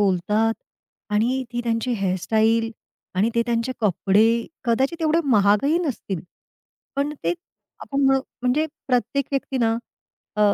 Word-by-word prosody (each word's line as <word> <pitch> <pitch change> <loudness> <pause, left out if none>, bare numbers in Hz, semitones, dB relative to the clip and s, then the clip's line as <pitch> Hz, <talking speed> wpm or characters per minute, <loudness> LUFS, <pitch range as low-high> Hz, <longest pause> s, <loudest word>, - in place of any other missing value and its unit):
बोलतात 210 +4 +2 0.6
आणि 240 +5 +1
ती 240 - -1
त्यांची 230 +1 0
हेअर 195 -4 0
स्टाईल 225 +3 +2 0.4
आणि 205 +5 +2
ते 235 - +3
त्यांचे 235 +2 0
कपडे. 215 +3 +3 0.2
कदाचित 265 +8 +1
एवढे 315 +1 +3
महागही 210 - +4
नसतील 240 - -3 0.8
पण 285 +2 0
ते - - +2 0.5
आपण 275 0 -1
म्हण 270 0 +5 0.3
म्हणजे 275 +6 +2 0.2
प्रत्येक 250 +2 +1
व्यक्तीना 255 -4 +1 0.6
अ, - - 0
230 Hz, 125 wpm, -23 LUFS, 215-270 Hz, 0.8 s, म्हण